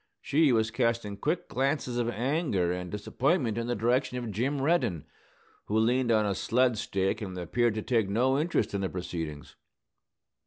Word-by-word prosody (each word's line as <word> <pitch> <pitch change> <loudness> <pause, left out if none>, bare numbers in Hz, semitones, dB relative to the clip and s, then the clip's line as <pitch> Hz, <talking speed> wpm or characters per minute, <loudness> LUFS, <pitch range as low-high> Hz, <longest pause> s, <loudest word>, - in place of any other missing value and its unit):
She 150 -1 +3
was 110 -2 +2
casting 115 -3 0
quick 160 - -2
glances 130 -2 -1
of 120 -1 0
anger 120 - 0
and 90 0 -5
disappointment 120 - 0
in 115 0 -2
the 120 - 0
direction 125 +3 +1
of 120 -3 -4
Jim 130 +8 -1
Reddin, 135 - +1 0.6
who 105 - -1
leaned 120 +2 +2
on 110 -1 +3
a 100 - +1
sled 125 +5 +2
stake 95 +3 -1
and 95 -3 -5
appeared 110 +6 0
to 110 - -3
take 115 -5 +1
no 130 +6 +2
interest 155 -10 0
in 100 - -1
the 95 - -1
proceedings. 85 -5 -6
115 Hz, 170 wpm, -29 LUFS, 100-130 Hz, 0.6 s, She